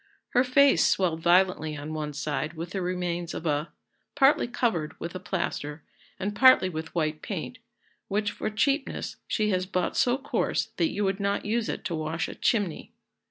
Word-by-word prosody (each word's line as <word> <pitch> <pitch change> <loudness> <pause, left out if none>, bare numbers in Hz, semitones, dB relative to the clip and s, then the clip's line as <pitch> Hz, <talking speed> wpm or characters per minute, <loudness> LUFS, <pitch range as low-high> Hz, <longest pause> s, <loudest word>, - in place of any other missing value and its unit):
Her 245 - +3
face 270 +2 +5
swelled 170 -4 +1
violently 175 -3 +3
on 150 +2 -6
one 150 -1 -3
side 155 +2 -2
with 165 +2 -6
the 195 - -2
remains 175 -1 -2
of 165 - -6
a, 150 0 0 0.4
partly 290 0 +4
covered 225 -11 -1
with 170 - -5
a 185 - -5
plaister, 170 -5 -3 0.4
and 200 +2 -2
partly 255 -6 +6
with 160 -1 -6
white 155 -2 -1
paint, 210 +6 -5 0.5
which 205 +1 0
for - - -3
cheapness 275 +7 -1
she 210 -2 +1
has 185 -1 0
bought 185 -1 -1
so 245 +1 +3
coarse 270 - -1
that 325 - +2
you 205 - -2
would 195 0 0
not 200 0 -1
use 225 +1 0
it - - -4
to 170 - -2
wash 160 +1 -2
a - - -6
chimney. 205 -8 -1
185 Hz, 180 wpm, -27 LUFS, 160-215 Hz, 0.5 s, partly